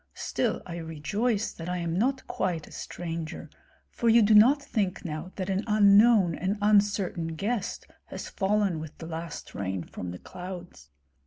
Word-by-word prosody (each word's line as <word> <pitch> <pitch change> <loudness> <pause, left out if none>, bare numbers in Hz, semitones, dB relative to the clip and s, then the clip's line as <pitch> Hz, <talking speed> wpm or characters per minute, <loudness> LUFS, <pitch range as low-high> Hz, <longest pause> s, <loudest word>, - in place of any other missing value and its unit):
Still - - -1
I 170 -1 -6
rejoice 200 +8 -1
that 165 +1 -7
I 180 - -1
am 170 -1 -2
not 260 +7 0
quite 165 -4 -2
a - - -16
stranger, 165 -2 -6 0.4
for 235 - +1
you 230 0 +6
do 210 +1 +4
not 240 +8 +7
think 205 -9 -2
now 160 +3 -5
that 185 -2 -3
an 195 +1 0
unknown 210 -2 +6
and 190 +6 -1
uncertain 200 -5 +2
guest 205 +4 -2 0.2
has - - -7
fallen 200 -3 0
with 155 -1 -8
the 165 - -8
last 165 -1 -6
rain 95 -2 -3
from 90 - -7
the 90 - -6
clouds. 180 - -9
185 Hz, 165 wpm, -28 LUFS, 165-210 Hz, 0.4 s, not